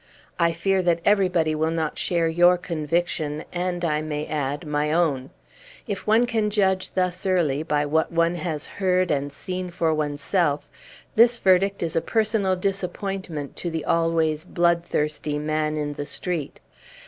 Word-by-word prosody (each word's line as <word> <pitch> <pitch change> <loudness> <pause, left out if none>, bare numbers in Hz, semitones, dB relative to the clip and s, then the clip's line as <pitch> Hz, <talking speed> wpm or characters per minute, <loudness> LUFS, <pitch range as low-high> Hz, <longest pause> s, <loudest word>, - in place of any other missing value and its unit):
I 170 -1 +4
fear 190 +3 +1
that 175 -2 +2
everybody 180 -6 +3
will 155 +1 0
not 160 -2 -2
share 170 -2 +1
your 175 +2 +5
conviction, 160 -2 -2
and, 175 0 -2
I 150 -2 0
may 150 -1 -3
add, 145 +1 -3
my 150 0 0
own. 150 -6 +1 0.6
If 205 -3 -5
one 225 +3 +5
can 220 -3 0
judge 190 -3 +1
thus 180 -1 0
early 160 -7 +2
by 150 -2 0
what 160 +2 +1
one 170 0 +2
has 160 -3 -3
heard 185 -2 0
and 145 -1 -1
seen 180 +5 -5
for 170 -2 0
oneself, 150 +1 0 0.5
this 235 +2 +6
verdict 195 0 +3
is 165 - -3
a 165 - +2
personal 215 -3 +1
disappointment 190 -4 -3
to 175 - -3
the 160 -1 -4
always 165 -2 +1
bloodthirsty 170 -4 0
man 155 0 -1
in 145 -1 -2
the 145 0 -5
street. 160 -1 -3
170 Hz, 155 wpm, -24 LUFS, 150-185 Hz, 0.6 s, this